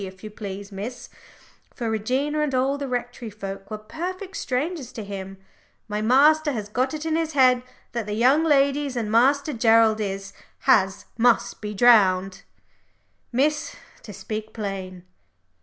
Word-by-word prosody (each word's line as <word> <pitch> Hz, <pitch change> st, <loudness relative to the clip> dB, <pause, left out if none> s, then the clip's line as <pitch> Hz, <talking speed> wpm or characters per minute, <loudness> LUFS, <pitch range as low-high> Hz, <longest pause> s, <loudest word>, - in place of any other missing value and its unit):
if 190 Hz, 0 st, -10 dB
you 215 Hz, -, -7 dB
please, 200 Hz, -1 st, -7 dB
Miss," 215 Hz, +6 st, -7 dB, 0.7 s
for 235 Hz, -, -3 dB
Regina 255 Hz, +8 st, -1 dB
and 295 Hz, -3 st, 0 dB
all 270 Hz, +2 st, +1 dB
the 280 Hz, -, -3 dB
Rectory 245 Hz, -2 st, -4 dB
folk 195 Hz, -1 st, -8 dB
were 215 Hz, -, -4 dB
perfect 365 Hz, -, -6 dB
strangers 275 Hz, +1 st, -3 dB
to 220 Hz, -, -6 dB
him 195 Hz, -1 st, -7 dB, 0.5 s
"my 210 Hz, 0 st, -3 dB
master 295 Hz, +6 st, +4 dB
has 210 Hz, -3 st, -5 dB
got 255 Hz, +6 st, -1 dB
it 305 Hz, +1 st, -6 dB
in 320 Hz, -1 st, 0 dB
his 325 Hz, -1 st, -1 dB
head 255 Hz, -3 st, +5 dB, 0.3 s
that 235 Hz, -3 st, -4 dB
the 210 Hz, -, -2 dB
young 260 Hz, +8 st, +4 dB
ladies 280 Hz, -2 st, +2 dB
and 220 Hz, -3 st, -2 dB
Master 275 Hz, +6 st, +3 dB
Gerald 225 Hz, -2 st, +4 dB
is 195 Hz, -1 st, -4 dB, 0.3 s
has 200 Hz, -6 st, +3 dB
must 240 Hz, 0 st, +2 dB
be 210 Hz, -1 st, -5 dB
drowned, 195 Hz, -4 st, +4 dB, 0.9 s
Miss, 300 Hz, -, 0 dB, 0.3 s
to 210 Hz, -, -10 dB
speak 215 Hz, +2 st, -6 dB
plain." 190 Hz, -4 st, -5 dB
235 Hz, 155 wpm, -24 LUFS, 205-275 Hz, 0.9 s, head